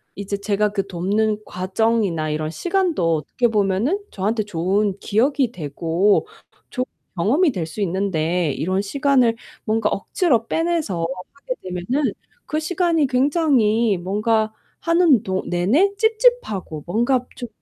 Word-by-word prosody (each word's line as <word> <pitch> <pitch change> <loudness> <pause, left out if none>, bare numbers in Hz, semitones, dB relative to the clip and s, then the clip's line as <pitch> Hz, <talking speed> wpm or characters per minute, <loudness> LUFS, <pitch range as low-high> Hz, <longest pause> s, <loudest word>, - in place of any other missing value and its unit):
이제 200 0 -4
제가 205 +1 0
그 200 -1 -2
돕는 205 +4 0
과정이나 190 -3 0
이런 155 0 -2
시간도 335 - 0
어떻게 240 +10 0
보면은 215 - +1
저한테 215 +3 -1
좋은 195 +2 0
기억이 250 +4 +1
되고 170 - +1 0.5
좋은 255 0 -2 0.3
경험이 270 - +2
될 175 -6 -3
수 165 - -9
있는데 175 -3 0
이런 185 +4 -1
시간을 255 +1 +2 0.3
뭔가 220 -1 +1
억지로 235 - 0
빼내서 320 - -1 0.3
하게 280 +13 -5
되면은 185 +11 -1 0.4
그 305 - -1
시간이 330 -1 +1
굉장히 250 - +2
뭔가 215 +4 0 0.3
하는 335 - +4
동 190 0 -3
내내 220 - +3
찝찝하고 435 - +1
뭔가 240 +6 +1
좀 245 - -6
215 Hz, 275 characters per minute, -21 LUFS, 185-280 Hz, 0.5 s, 하는